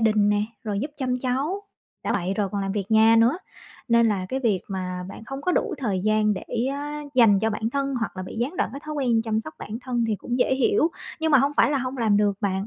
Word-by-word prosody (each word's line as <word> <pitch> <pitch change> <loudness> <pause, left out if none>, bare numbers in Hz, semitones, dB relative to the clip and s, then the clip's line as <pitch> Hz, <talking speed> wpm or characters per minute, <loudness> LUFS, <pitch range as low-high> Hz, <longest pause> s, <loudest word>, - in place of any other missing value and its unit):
đình 215 -2 +3
nè, 205 0 +2 0.2
rồi 205 -2 -2
giúp 290 +3 -3
chăm 255 -2 -1
cháu, 275 +10 -1 0.4
đã - - 0
vậy 185 0 -1
rồi 200 -1 0
còn 200 -1 -1
làm 195 0 -2
việc 205 0 -3
nhà 220 +1 +6
nữa, 240 +10 +4 0.5
nên 235 0 +5
là 195 -3 -1
cái 265 +5 -2
việc 215 -7 +1
mà 185 -2 -4
bạn 210 - -10
không 270 +3 -5
có 360 - +1
đủ 385 - 0
thời 205 -8 -1
gian 215 +1 +2
để 185 - -6 0.7
dành 225 -6 +6
cho 220 +1 +1
bản 220 +1 -2
thân 275 +1 -1
hoặc 225 -5 -3
là 185 - -4
bị 185 - -8
gián 265 +9 -2
đoạn - - 0
cái 275 - -7
thói 305 0 -5
quen 240 -5 +1
chăm 220 -1 0
sóc 155 -7 -9
bản 220 +3 -6
thân 245 -2 -1
thì 215 - 0
cũng 245 +5 -3
dễ 260 - +3
hiểu. 325 +5 +3 0.3
Nhưng 320 0 +1
mà 280 - +8
hông 280 +3 +2
phải - - +5
là 285 - +1
hông 255 +1 -3
làm 220 -3 +3
được 205 0 +3
bạn, 195 0 -1
225 Hz, 260 wpm, -24 LUFS, 205-265 Hz, 0.7 s, mà